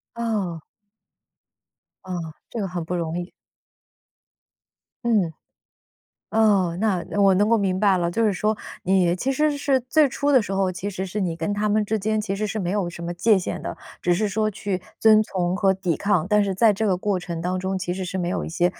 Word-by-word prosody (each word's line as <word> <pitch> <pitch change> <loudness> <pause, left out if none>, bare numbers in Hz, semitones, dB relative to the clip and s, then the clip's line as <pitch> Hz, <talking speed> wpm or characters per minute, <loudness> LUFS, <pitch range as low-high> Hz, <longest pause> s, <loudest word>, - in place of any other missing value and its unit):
哦。 205 -8 -2 1.4
啊， 185 - -5 0.4
这 230 - -3
个 195 - -1
很 175 -2 -4
不 180 - -3
容 165 0 -2
易。 175 - -6 1.8
嗯， 200 -8 +2 1.0
哦， 200 -6 +3
那 200 -5 +1 0.2
我 195 -1 +6
能 205 +2 +3
够 230 - +4
明 190 -2 0
白 200 -3 +4
了。 170 -1 0
就 230 +6 0
是 205 - +1
说， 215 +4 +1 0.3
你 180 -2 +2
其 265 +8 -1
实 300 +1 +1
是 275 -2 +1
最 295 +5 +3
初 285 +3 0
的 260 -5 +5
时 195 - -5
候， 195 -1 +1
其 185 +3 -4
实 190 0 -4
是 205 +3 -4
你 170 -3 -1
跟 170 +5 -2
他 210 0 0
们 215 0 +3
之 220 +1 0
间 215 +2 0
其 200 -2 -3
实 215 +1 -1
是 215 +1 -3
没 180 -3 -2
有 195 -4 -1
什 170 - -9
么 175 +1 -4
界 210 +4 +4
限 180 - -4
的， - - -4 0.3
只 175 - +2
是 210 +4 +1
说 215 +2 0
去 195 -2 -3 0.2
遵 215 -1 +6
从 180 -3 -1
和 195 -1 +3
抵 185 -3 -1
抗。 200 -5 +1
但 210 -1 +4
是 195 -1 -1
在 215 +1 +4
这 220 +2 -1
个 185 -2 +1
过 200 -1 0
程 170 -2 -5
当 180 +2 -1
中， 190 +1 -2
其 175 0 -3
实 190 0 -4
是 185 +1 -4
没 175 -1 -1
有 - - -2
一 - - -5
些， 175 +2 +2
195 Hz, 235 characters per minute, -23 LUFS, 180-215 Hz, 1.8 s, 我